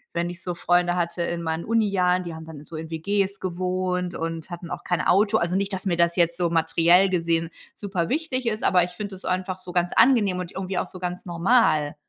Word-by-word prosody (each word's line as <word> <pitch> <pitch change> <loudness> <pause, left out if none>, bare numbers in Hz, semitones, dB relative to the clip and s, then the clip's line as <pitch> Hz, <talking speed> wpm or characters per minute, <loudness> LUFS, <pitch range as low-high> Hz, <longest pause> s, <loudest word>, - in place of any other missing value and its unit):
wenn 170 0 0
ich 175 +1 -9
so 180 - -3
Freunde 175 +1 +2
hatte 170 0 -2
in 170 0 -2
meinen 160 0 -3
Unijahren, 195 -5 +2
die 170 -2 -6
haben 160 0 -9
dann 155 -2 -10
so 165 - -10
in 160 0 -6
WGs 195 +4 -1
gewohnt 180 0 -2
und 165 +1 -4
hatten 175 0 -7
auch - - -6
kein 175 -4 0
Auto 205 +5 +3
also, 175 +2 -1
nicht, 200 +1 0
dass 190 +1 -4
mir 175 - +1
das 170 0 +2
jetzt 170 -1 +2
so 175 -2 +1
materiell 170 +3 +4
gesehen 165 -2 0 0.2
super 190 -5 -3
wichtig 270 -4 -2
ist, 215 -1 -1
aber 180 -1 +4
ich 180 - -4
finde 200 +1 -6
das 185 - -11
einfach 185 0 -2
so 185 -1 -10
ganz 175 0 0
angenehm 220 -7 +4
und 180 -1 -5
irgendwie 190 -1 -4
auch - - 0
so 185 - -10
ganz 180 0 -4
normal. 170 -4 +2
180 Hz, 230 wpm, -24 LUFS, 170-190 Hz, 0.2 s, materiell